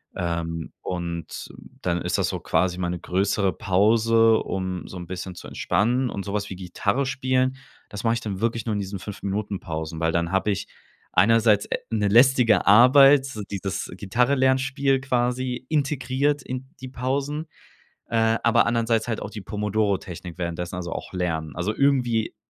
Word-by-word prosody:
Ähm, 85 -1 -3
und 85 -3 -5 0.3
dann 85 -1 0
ist - - -1
das - - +1
so - - -3
quasi 90 -1 0
meine 90 -1 -2
größere 95 +2 0
Pause, 115 +3 +3
um 95 -1 -4
so 95 - -8
'n 90 -1 -8
bisschen 95 +1 -6
zu - - -10
entspannen. 125 +4 0
Und 100 - -4
so 100 - -5
was 105 -1 -2
wie - - -4
Gitarre 100 +8 -1
spielen, 130 -1 0 0.3
das 105 0 -7
mach 115 -1 +3
ich 115 - -2
dann 100 -3 -4
wirklich 115 0 -1
nur 110 - 0
in 105 - -1
diesen 100 0 -5
5 100 +2 -8
Minuten-Pausen, 90 -6 -4
weil 80 0 +1
dann 85 0 -1
hab 95 +2 0
ich 100 -1 -1 0.5
einerseits, 110 +1 +4
äh, - - -1
'ne 105 -2 +1
lästige 120 0 +5
Arbeit, 135 +6 +7
so 135 -6 -6
dieses 100 -1 -4
Gitarre-Lernspiel 130 +5 +1
quasi, 125 -1 -1
integriert 140 -1 0
in 130 +1 -6
die 130 - -7
Pausen, 140 +5 -2 0.6
äh, 115 0 +2
aber 115 - +4
andererseits 115 -1 +1
halt 115 -2 -2
auch - - -6
die 105 - -7
Pomodoro-Technik 100 -4 -2
währenddessen, 85 0 -4
also 90 -2 -5
auch - - -7
Lernen. 80 -5 -2
Also 95 +5 -2
irgendwie 125 -6 +1
105 Hz, 165 wpm, -24 LUFS, 95-125 Hz, 0.6 s, Arbeit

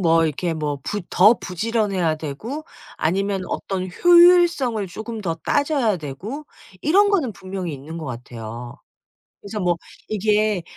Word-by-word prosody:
뭐 165 -2 +4
이렇게 165 +3 -2
뭐 150 -2 -2
부 210 - -3
더 210 +6 +6
부지런해야 195 -4 -1
되고 215 - -6 0.3
아니면 195 +3 0
어떤 185 -1 -3
효율성을 345 - +5
쪼금 220 +5 -6
더 170 -5 -2
따져야 275 - +1
되고 175 - -6 0.4
이런 400 +7 +4
거는 300 - +1
분명히 185 -4 -5
있는 145 +4 -8
것 160 - -6
같아요. 120 -1 -7 0.7
그래서 210 +1 -6
뭐 175 -1 +2 0.3
이게 210 -2 +1
195 Hz, 280 characters per minute, -22 LUFS, 165-230 Hz, 0.7 s, 더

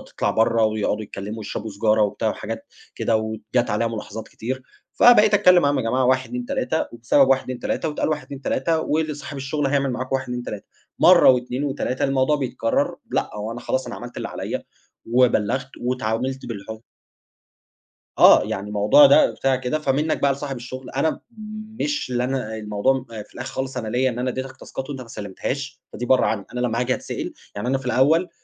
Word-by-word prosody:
تطلع - - +1
برّه 115 0 +3
ويقعدوا 110 0 -1
يتكلموا 100 +2 -7
ويشربوا 110 0 -5
سيجارة 110 +2 +2
وبتاع 105 0 +1
وحاجات - - -5 0.3
كده، 115 - +1
وجات 110 +2 -2
عليَّ 105 +3 +1
ملاحظات 110 -1 -6
كتير 130 +3 -5 0.3
فبقيت 215 -3 +6
أتكلّم 180 -3 +6
معاهم 145 0 +2
يا 130 - -2
جماعة 125 +3 +1
1، 130 0 +2
2، 245 0 -4
3، 260 -11 -1
وبسبب 120 +4 +3
1، 135 -1 +3
2، 130 -1 -6
3، 160 - -2
واتقال 150 - -1
1، 150 -3 -2
2، 140 0 -9
3، 160 +5 0
وصاحب 150 -2 -2
الشغل 140 +1 -1
هيعمل 140 -1 +1
معاكوا 130 +2 -1
1 - - -6
2، 125 0 -3
3، 105 -4 -7 0.3
مرّة - - +7
و2 125 +1 +1
و3. 135 -2 -2
الموضوع 135 +2 +2
بيتكرر؟ 125 -4 -1 0.2
لأ - - 0
هو 105 +2 -4
أنا 120 - -6
خلاص 130 +2 -2
أنا - - -6
عملت - - -9
اللي - - -3
عليَّ - - -4 0.5
وبلَّغت 125 +1 +2
واتعاملت 125 +1 -2
بالح 110 0 -6 1.4
آه، - - +8
يعني 100 +1 -4
الموضوع 105 +7 +6
ده 140 - +6
بتاع 135 -1 +1
كده، 130 +4 -2
فمنك 150 +2 0
بقى 140 -1 +4
لصاحب 140 0 -5
الشغل، 125 +1 -8
أنا 140 +4 0 0.6
مش 295 - -1
اللي 125 0 0
أنا 125 -4 -2
الموضوع 110 +5 0
في 110 -2 -9
الآخر 125 - -6
خالص 130 -1 -3
أنا 110 - -3
ليّا 125 +4 +1
إن 120 - -5
أنا 125 +1 0
أدّيتك 130 +1 -5
تاسكات 135 +1 -7
وأنت 135 -3 -5
ما 125 - -10
سلمتهاش، 130 +7 -5
فدي 125 - -4
برّه 130 +1 +4
عنّي. 100 -3 -1
أنا 125 - -3
لمّا 120 -1 0
هاجي 125 +1 +1
اتسأل، - - -5 0.2
يعني 105 +4 -3
أنا 135 +1 +2
في 135 - -10
الأوّل 155 +8 +3
130 Hz, 190 wpm, -22 LUFS, 115-135 Hz, 1.4 s, آه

